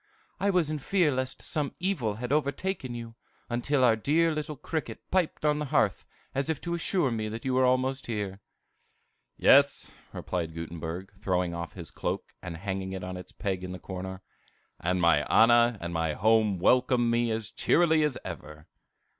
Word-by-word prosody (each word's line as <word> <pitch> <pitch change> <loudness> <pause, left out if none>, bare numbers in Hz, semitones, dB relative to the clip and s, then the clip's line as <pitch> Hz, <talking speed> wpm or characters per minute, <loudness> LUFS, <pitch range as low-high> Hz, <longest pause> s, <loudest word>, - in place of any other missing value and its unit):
"I 200 +2 +2
was 175 -6 +2
in 155 - -2
fear 175 +1 +2
lest 130 0 -3
some 150 -3 -2
evil 165 - -1
had 125 +3 -5
overtaken 145 -1 -1
you, 115 -1 -7 0.4
until 130 +3 +1
our 120 -3 +6
dear 160 +9 +2
little 150 0 -4
cricket 155 +3 -4
piped 180 -4 0
on 150 0 +3
the 150 - -2
hearth, 135 - +1 0.3
as 135 +2 -1
if 160 -3 0
to 170 - -3
assure 170 -4 +1
me 110 -2 -2
that 115 +3 -6
you 130 - 0
were 130 0 +4
almost 130 +1 +1
here." 100 -4 -3 1.0
"Yes," 140 +1 +5 0.2
replied 85 -3 -4
Gutenberg, 85 +3 -6
throwing 90 -3 0
off 85 0 -5
his 85 -5 -8
cloak, - - -4
and 90 -2 -6
hanging 95 +1 -4
it 95 -1 -5
on 90 0 -5
its 90 - -9
peg 95 -3 -3
in 90 0 -5
the - - -5
corner, 95 0 -7 0.6
"and 90 +2 0
my 85 -3 +4
Anna 120 0 +5
and 85 -1 -5
my 80 -1 0
home 110 +1 +3
welcome 120 +4 +3
me 120 0 +2
as 110 -1 -2
cheerily 160 -2 +3
as 150 -4 +1
ever." 75 -4 -8
115 Hz, 180 wpm, -28 LUFS, 95-145 Hz, 1.0 s, our